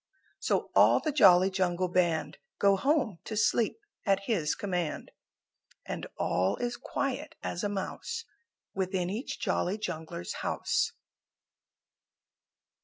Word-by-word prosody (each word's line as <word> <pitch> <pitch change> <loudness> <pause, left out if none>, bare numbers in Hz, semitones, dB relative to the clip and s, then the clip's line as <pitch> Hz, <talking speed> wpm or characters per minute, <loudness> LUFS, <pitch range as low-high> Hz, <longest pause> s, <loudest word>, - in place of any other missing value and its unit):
So - - 0
all - - +6
the 310 - -1
Jolly 190 -9 +6
Jungle 185 -1 +1
Band 165 -4 0 0.2
Go 200 -1 +4
home 250 - +1
to 215 - -4
sleep 220 - +2 0.3
at 195 -2 +2
his 170 -10 +1
command, 180 -6 -3 0.7
And - - -5
all 95 +2 +1
is 240 0 -2
quiet 275 +4 -3
as 175 - -3
a 205 - +1
mouse 460 - -4 0.5
Within 185 -1 -1
each 225 +7 -4
Jolly 185 +4 0
Jungler's 160 - -5
house. - - 0
190 Hz, 115 wpm, -30 LUFS, 175-225 Hz, 0.7 s, all